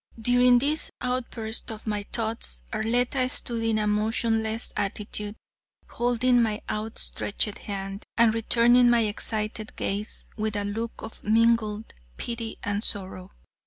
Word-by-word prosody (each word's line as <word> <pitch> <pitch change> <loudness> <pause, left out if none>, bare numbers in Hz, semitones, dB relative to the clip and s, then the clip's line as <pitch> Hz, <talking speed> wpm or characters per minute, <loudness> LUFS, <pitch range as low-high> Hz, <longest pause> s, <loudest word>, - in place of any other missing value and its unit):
During 245 +2 +5
this 295 +5 +1
outburst 240 -3 -1
of 220 -1 -8
my 210 -2 -1
thoughts, 220 - -2
Arletta 245 +3 +1
stood 235 -2 -1
in 225 -1 +1
a 210 - +1
motionless 220 +1 +1
attitude, 205 +1 -3 0.5
holding 245 +1 +2
my 215 -2 0
outstretched 215 -1 -1
hand 195 0 -5
and 230 -2 +5
returning 240 +2 +5
my 240 -1 +5
excited 215 0 -2
gaze 205 +2 -3
with 215 -1 -2
a 205 - 0
look 225 +3 -4
of 220 - -9
mingled 220 -1 +2 0.2
pity 230 -1 -4
and 205 +1 -1
sorrow. 190 -3 -3
220 Hz, 125 wpm, -26 LUFS, 210-235 Hz, 0.5 s, During